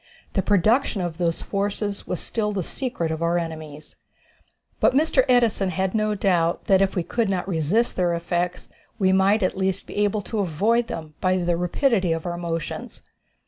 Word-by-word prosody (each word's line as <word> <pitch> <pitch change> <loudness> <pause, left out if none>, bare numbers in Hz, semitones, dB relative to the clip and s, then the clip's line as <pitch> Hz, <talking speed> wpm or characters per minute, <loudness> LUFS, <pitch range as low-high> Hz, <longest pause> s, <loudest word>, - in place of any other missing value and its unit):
The 195 - +2
production 210 +5 +2
of 175 -1 -4
those 170 -2 0
forces 205 0 -2
was 180 - -2
still 210 -2 -1
the 190 -3 -2
secret 205 -8 -3
of 160 0 -3
our 170 +1 +2
enemies. 155 -3 -6 0.8
But - - +3
Mr. 295 -2 +4
Edison 230 -6 +3
had 190 +1 -1
no 215 -1 +1
doubt 175 -4 +1
that 190 -1 +4
if 195 -1 +1
we 180 - 0
could 230 +3 -1
not 185 -2 -1
resist 190 +7 +1
their 175 -2 +1
effects 175 +1 -2 0.3
we 190 -2 +3
might 195 +2 +3
at 185 - 0
least 190 0 -1
be - - -9
able 205 0 +1
to 215 +2 -4
avoid 210 +7 +1
them 160 -9 -6
by 185 0 +2
the 175 -1 +1
rapidity 180 - +1
of 165 +1 -4
our 175 -1 -2
motions. 165 -2 -5
190 Hz, 185 wpm, -24 LUFS, 170-210 Hz, 0.8 s, Mr